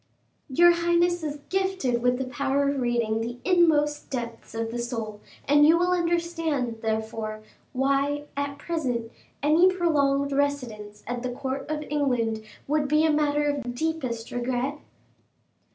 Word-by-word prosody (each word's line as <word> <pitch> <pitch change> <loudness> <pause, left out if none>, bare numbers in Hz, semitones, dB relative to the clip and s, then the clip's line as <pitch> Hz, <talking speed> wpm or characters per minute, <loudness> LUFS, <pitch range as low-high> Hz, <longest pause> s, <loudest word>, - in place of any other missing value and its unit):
"Your 345 +6 +6
highness 345 0 +2
is 295 -1 -4
gifted 375 -11 0
with 250 0 +2
the 265 - -2
power 275 +2 0
of 280 -1 0
reading 235 -2 0
the 240 +2 -4
inmost 310 -5 +3
depths 235 -4 -6
of 225 0 -2
the 240 - -4
soul, 225 -3 -4 0.3
and 290 +1 +6
you 320 +3 +6
will 355 +1 +2
understand, 335 -8 0
therefore, 220 -1 -3 0.3
why, 275 +2 +1
at 285 0 -3
present, 255 -8 -2 0.3
any 325 +5 +5
prolonged 280 -6 +1
residence 250 -8 -2
at 245 0 -3
the 250 - -2
court 265 +2 -4
of 305 -1 -2
England 245 -7 0 0.2
would 295 0 +1
be 305 +2 +3
a 315 - +4
matter 295 -1 +2
of 290 -1 0
the 245 - -6
deepest 250 -4 -3
regret." 250 +4 -2
280 Hz, 150 wpm, -26 LUFS, 240-310 Hz, 0.3 s, Your